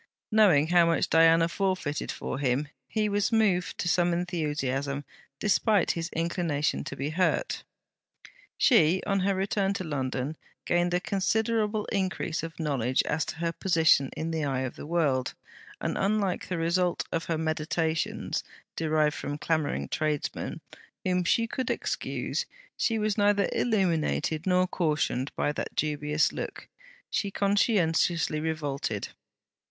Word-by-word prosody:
Knowing 195 -10 +5
how 175 -1 +6
much 165 -1 +1
Diana 165 0 +6
forfeited 180 -5 -1
for 130 - -4
him, 140 +1 0 0.2
he 215 -1 0
was 205 +1 0
moved 195 -7 +2
to - - -2
some 175 0 +2
enthusiasm, 145 -5 -2 0.3
despite 210 +1 +2
his 165 0 -3
inclination 165 -3 -1
to - - -5
be 140 +2 -3
hurt. 185 - 0 0.9
She, 185 - +4
on 195 -1 +1
her 195 +1 +1
return 195 +1 0
to 185 - -3
London, 135 -1 -3 0.3
gained 175 0 +2
a - - +2
considerable 215 +2 0
increase 190 -4 -1
of 165 0 -7
knowledge 130 -5 +1
as 150 +1 -1
to - - -5
her 165 +1 -1
position 160 -7 +3
in 160 +1 -2
the 160 -1 -1
eye 135 -2 -1
of 130 -2 -4
the - - -8
world; 145 -6 0 0.4
and - - -2
unlike 200 -2 0
the 180 - -2
result 170 +2 +1
of 165 - -1
her 165 - -1
meditations 160 0 -1 0.3
derived 155 -2 +1
from 145 - -4
the - - -4
clamouring 155 -1 -1
tradesmen, 155 -2 -2 0.4
whom 180 -1 +1
she 230 +6 +2
could 255 +1 -3
excuse, - - -2 0.3
she 225 - +1
was 215 -1 0
neither 205 -1 +3
illuminated 170 -6 0
nor 180 0 +4
cautioned 150 -7 -1
by 145 - +1
that - - -5
dubious 150 0 +1
look; - - -6 0.4
she 200 - 0
conscientiously 180 -6 +2
revolted. 145 -9 -2
165 Hz, 140 wpm, -28 LUFS, 150-190 Hz, 0.9 s, how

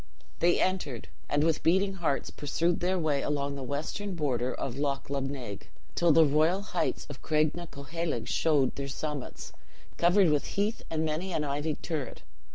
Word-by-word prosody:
They 175 +1 +4
entered, 155 - -1 0.2
and 145 +1 +2
with 160 -1 +2
beating 190 +4 +3
hearts 170 -7 -1
pursued 165 +4 0
their 185 +1 +1
way 155 -5 +1
along 140 -1 -1
the 140 - -6
western 155 +9 -3
border 130 -5 0
of 125 - -4
Loch 140 -1 -1
Lubnaig, 135 -6 -4 0.2
till 170 -1 +4
the 160 +1 +7
royal 155 +7 +3
heights 180 -3 -1
of 145 -2 -9
Craignacoheilg 155 -3 -1
showed 145 -5 +2
their 140 0 -3
summits, 145 -1 -5 0.4
covered 175 0 +5
with 150 -1 +2
heath 210 +3 +1
and 160 0 0
many 165 +4 -2
an 155 - 0
ivied 145 +2 -2
turret. 150 -7 -4
155 Hz, 160 wpm, -29 LUFS, 140-170 Hz, 0.4 s, the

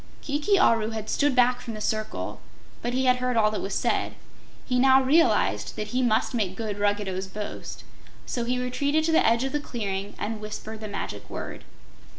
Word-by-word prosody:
Kiki 300 +8 +1
Aru 225 - +4
had 220 -1 -4
stood 290 -2 +2
back 250 0 +4
from 235 -3 -6
the - - -6
circle, 215 0 -3 0.4
but 240 - -2
he 260 0 +1
had 255 0 +4
heard 250 -1 0
all 215 -1 +4
that 215 - -3
was 195 0 -3
said. - - 0 0.5
He 250 -1 +1
now 265 +1 +6
realized 325 +6 +3
that 210 - -4
he 250 +1 0
must 240 0 +2
make 200 -6 -1
good 210 -1 -4
Ruggedo's 205 -2 0
boast, 210 +2 -7 0.4
so 240 - -2
he 250 +2 0
retreated 280 +5 0
to 325 - +1
the 320 - +5
edge 230 +2 +3
of 270 - -1
the 295 - 0
clearing 205 -7 -4
and 215 0 -4
whispered 215 +1 -6
the 215 - -5
magic 205 - -5
word. - - -6
235 Hz, 195 wpm, -26 LUFS, 215-260 Hz, 0.5 s, now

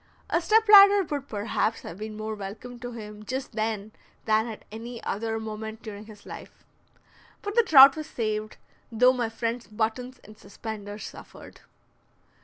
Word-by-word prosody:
A 335 - +2
step 440 +5 +3
ladder 405 -1 +9
would 285 -4 -5
perhaps 215 +1 -2
have 170 - -9
been 215 0 -6
more 215 0 -4
welcome 215 +5 -8
to 245 0 -7
him 210 -2 -9
just 260 +4 -5
then 215 -2 -3 0.3
than 220 +1 +2
at 220 -2 -9
any 235 +2 -7
other 225 +2 -2
moment 220 0 -7
during 210 0 -9
his 210 -2 -14
life. - - -11 0.8
But 410 0 -4
the 470 - +5
trout 275 -9 +8
was 310 -1 -6
saved, 215 -2 -3 0.3
though 250 +3 +5
my 240 -3 -2
friend's 230 +1 -4
buttons 230 +4 -3
and 215 0 -15
suspenders 205 0 -8
suffered. - - -12
225 Hz, 160 wpm, -26 LUFS, 215-255 Hz, 0.8 s, ladder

